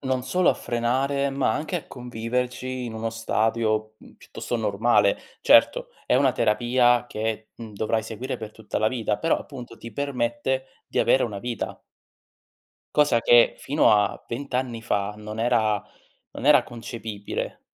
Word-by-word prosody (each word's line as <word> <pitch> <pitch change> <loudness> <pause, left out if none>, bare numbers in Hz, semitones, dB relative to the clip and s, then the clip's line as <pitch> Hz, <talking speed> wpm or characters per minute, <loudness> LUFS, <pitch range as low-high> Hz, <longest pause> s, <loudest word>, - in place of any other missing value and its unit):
non 130 -2 -1
solo 180 +7 +2
a - - +6
frenare, 135 +4 0
ma 135 -1 +1
anche 160 +4 -2
a 165 - -6
conviverci 125 +1 -3
in 115 - -6
uno 110 +1 -3
stadio, 110 -1 0
mhmm, - - -17
piuttosto 120 - -5
normale. 110 - +2 0.3
Certo - - +5
è - - +3
una 135 -1 +4
terapia 120 +2 +3
che, 110 -1 -4
mhmm, 115 -2 -10
dovrai 110 +1 0
seguire 125 +4 -5
per 110 -2 -7
tutta 110 -1 -5
la 110 +1 +3
vita, 110 -4 -1
però 165 - +1
appunto 125 -4 -10
ti 115 -1 -10
permette 130 -1 -1 0.2
di - - -2
avere 135 - +4
una 105 -4 -3
vita. 120 0 -5 1.2
Cosa 145 -6 +4
che 120 -1 +6
fino 145 +3 +3
a 105 -1 +2
20 135 +2 -5
anni 125 -3 -1
fa 105 -2 -1
non 105 +1 -6
era 110 -3 +2 0.5
non 135 - -6
era 150 -1 +7
concepibile. 115 -3 -6
120 Hz, 155 wpm, -25 LUFS, 110-130 Hz, 1.2 s, era